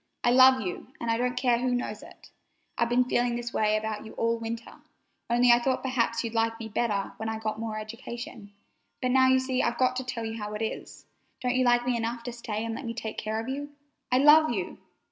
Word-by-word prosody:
I 240 - +4
love 260 0 +7
you, 180 -4 -5
and 235 - -1
I 230 - +1
don't 245 +1 -1
care 245 -2 +2
who 250 0 0
knows 215 -4 -3
it! - - -15 0.4
I've 235 - +1
been 245 +1 +4
feeling 245 -1 0
that 240 0 -5
way 215 0 +2
about 215 0 -4
you 220 - -10
all 230 0 0
winter, 230 0 -6 0.5
only 240 +1 +5
I 240 - +6
thought 260 +2 -1
perhaps 235 -3 0
you'd 230 -1 -4
like 225 0 0
me 225 -1 -6
better 205 -2 -1
when 220 0 -3
I 220 - -3
got 215 0 -3
more 220 -1 -4
education; 225 0 -8 0.5
but 255 -1 0
now 260 0 +5
you 260 0 +5
see 260 0 0
I've - - +1
just - - -13
got 255 -1 +3
to 260 - -2
tell 240 -2 -4
you 225 0 -5
how 210 0 -4
it 215 - -3
is. 220 - -6 0.3
Don't 250 -1 0
you 255 0 +2
like 240 0 +3
me 250 -1 +1
enough 235 +1 -3
to 245 - -4
stay 225 -2 -4
and 230 - -3
let 270 - -6
me 230 0 -4
take 220 -1 -5
care 215 +1 -2
of 225 - -5
you? 285 +2 -5 0.4
I 250 - +4
love 300 +3 +7
you!" 200 -6 -3
235 Hz, 245 wpm, -27 LUFS, 225-250 Hz, 0.5 s, love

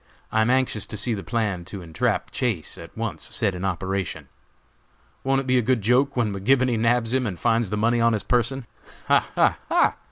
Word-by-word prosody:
I 110 - +2
am 110 - +2
anxious 130 -5 +1
to 105 - -5
see 115 +3 -1
the 100 - -3
plan 100 0 -1
to 95 0 -8
entrap 80 -2 -1
Chase 110 - -2
at 85 +4 -12
once 105 -9 -4
set 105 -4 +1
in 90 +1 -6
operation. 95 0 -3 0.9
Won't 135 0 +2
it - - -8
be 130 -1 +3
a - - +2
good 120 -2 +1
joke 130 +5 +2
when 110 -4 +1
McGibony 125 +4 +2
nabs 115 0 +1
him 130 -2 +1
and 90 -5 -5
finds 115 -1 +1
the 105 - -2
money 115 +2 +2
on 115 0 +4
his 105 -3 -1
person? 125 +4 0 0.4
Ha! - - +4
ha! - - +3
ha! - - +3
115 Hz, 210 wpm, -24 LUFS, 100-125 Hz, 0.9 s, on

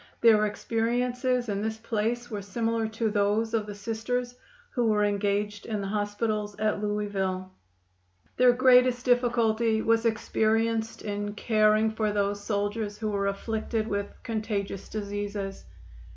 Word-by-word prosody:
Their 215 -2 +6
experiences 245 +3 0
in 200 -1 -1
this 220 +1 -2
place 230 +2 -2
were 210 -2 -3
similar 225 +2 -1
to 220 0 -1
those 210 +2 +1
of 215 -2 0
the 205 - -6
Sisters 230 +4 -3 0.4
who 245 -4 +1
were 210 -1 +3
engaged 205 0 -1
in 215 -2 -2
the 195 -1 -3
hospitals 210 0 -1
at 215 -1 0
Louisville. 195 -3 -2 0.9
Their 250 0 +7
greatest 250 0 +4
difficulty 235 -3 +2
was 230 0 +3
experienced 225 0 0
in 205 0 -3
caring 215 0 +3
for 220 -1 0
those 205 0 -1
soldiers 205 0 -2
who 215 -1 -2
were 200 -1 0
afflicted 220 +2 -2
with 200 -1 -1 0.2
contagious 215 -4 -3
diseases. 205 -1 -4
215 Hz, 135 wpm, -27 LUFS, 205-230 Hz, 0.9 s, Their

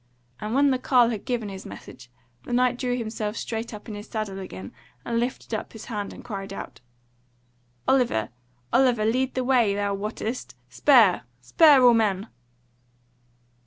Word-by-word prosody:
And 215 +3 -3
when 280 0 +4
the 260 - 0
carle 245 -3 +4
had 215 -3 -5
given 240 -5 -2
his 190 -1 -8
message 125 -1 -11 0.3
the - - -6
Knight 250 0 +2
drew 250 -1 -1
himself 220 -2 -4
straight 225 0 -4
up 210 0 -10
in 220 - -6
his 205 +1 -8
saddle 215 -3 -4
again 100 - -8 0.3
and 230 0 0
lifted 240 -1 -3
up 220 - -4
his 225 - -9
hand 205 -4 -4
and - - -11
cried 195 -4 -6
out: 195 - -8 1.1
"Oliver! 240 - +2 0.4
Oliver! 245 -4 +3
lead 255 +4 +1
on - - -31
the 255 - 0
way 245 -6 +3
thou 205 0 -1
wottest! 215 - -4
Spur! 230 - +5 0.2
spur, 275 - +5
all 245 -1 +8
men!" 210 -2 +1
225 Hz, 165 wpm, -25 LUFS, 205-250 Hz, 1.1 s, all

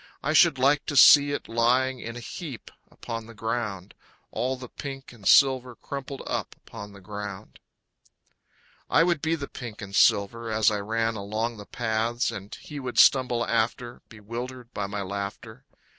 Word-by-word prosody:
I 155 - 0
should 160 -3 +5
like 140 +3 +2
to 145 - -1
see 145 +2 +8
it 145 - -4
lying 125 +3 +2
in 115 0 -7
a - - -6
heap 140 - -8 0.2
upon 115 -1 -7
the 115 - -12
ground. 105 -4 -4 0.4
All 130 +2 -2
the 125 -1 -9
pink 135 0 -8
and 105 -4 -8
silver 130 -2 +5
crumpled 140 +1 -7
up - - -3
upon 105 -2 -11
the 100 - -14
ground. 100 0 -8 1.3
I 165 - +5
would 170 -4 +1
be 160 0 +1
the 140 -3 -6
pink 120 -4 -9
and 100 -1 -7
silver 115 +5 +3
as 110 0 +3
I 105 - -1
ran 115 +2 -1
along 110 +3 -3
the 105 - -11
paths, 115 +1 -1
And 100 +1 -8
he 150 - -8
would 125 -2 -6
stumble 125 -3 +5
after, 120 +1 -1
Bewildered 120 +3 -8
by 100 -2 -3
my 100 0 -4
laughter. 100 +6 -6
115 Hz, 170 wpm, -26 LUFS, 105-130 Hz, 1.3 s, see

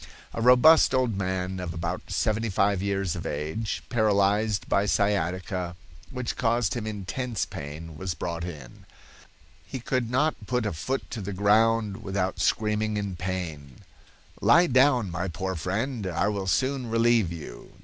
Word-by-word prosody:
A - - -3
robust 125 +5 +6
old 125 -4 +1
man 95 -1 -2
of 90 -2 -5
about 85 - -4
seventy 110 +1 0
five 100 0 +2
years 100 -3 -1
of - - -5
age, 80 +10 -3
paralyzed 105 -2 +2
by 100 +1 +2
sciatica, 90 -3 0 0.3
which 125 -3 -4
caused 115 -5 +1
him 110 -3 -4
intense 110 +3 -3
pain, 75 +3 -8
was 95 -1 -3
brought 85 +2 -4
in. 75 -9 -9 0.8
"He 130 - -6
could 125 -1 -1
not 130 -4 0
put 125 -2 0
a 105 - -1
foot 130 - -3
to 115 - -4
the 100 +1 -4
ground 105 +1 +3
without 95 -1 -2
screaming 110 0 +1
with 100 -4 -3
pain. 85 -8 -5 0.6
'Lie 170 +1 +6
down, 125 -7 +4
my 90 +2 -2
poor 95 +2 -3
friend; 100 - -2
I 90 +3 0
will 100 -2 -3
soon 130 +5 0
relieve 115 -4 +3
you.' 85 -3 -8
Dr. - - -23
100 Hz, 155 wpm, -26 LUFS, 90-115 Hz, 0.8 s, robust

